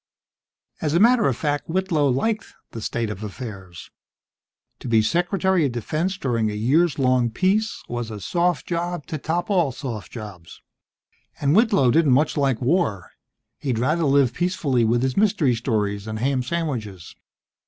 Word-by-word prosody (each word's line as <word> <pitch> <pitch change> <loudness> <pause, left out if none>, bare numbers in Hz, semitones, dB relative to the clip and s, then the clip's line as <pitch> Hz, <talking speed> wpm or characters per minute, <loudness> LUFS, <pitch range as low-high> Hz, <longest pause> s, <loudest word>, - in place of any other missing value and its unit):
As 155 0 0
a - - +4
matter 235 - +5
of 130 - 0
fact, 145 0 -2
Whitlow 170 -4 +1
liked 215 - -1 0.2
the 115 - -7
state 115 0 -2
of 105 +1 -7
affairs. 100 -5 -8 0.9
To - - -8
be 110 -2 +3
Secretary 180 - +1
of 125 - -5
Defense 155 - -2
during 115 - 0
a 105 - -4
years 145 +10 +2
long 130 -3 +2
peace 195 - 0
was 120 -1 -4
a 105 -2 -6
soft 175 - 0
job 175 -2 -3
to 155 - -5
top 175 +7 -2
all 175 -8 +2
soft 120 -6 -6
jobs. 100 -7 -10 0.8
And 145 +2 +2
Whitlow 205 - +4
didn't 155 -2 +4
much 145 +4 +2
like 135 -5 +1
war. 125 - 0 0.5
He'd 130 -5 -2
rather 155 +8 +1
live 135 -3 +3
peacefully 160 -8 0
with 120 +2 +2
his 130 -1 0
mystery 195 - +2
stories 105 -3 -2
and 110 0 -4
ham 130 +3 0
sandwiches. 125 - -4
135 Hz, 160 wpm, -23 LUFS, 115-170 Hz, 0.9 s, matter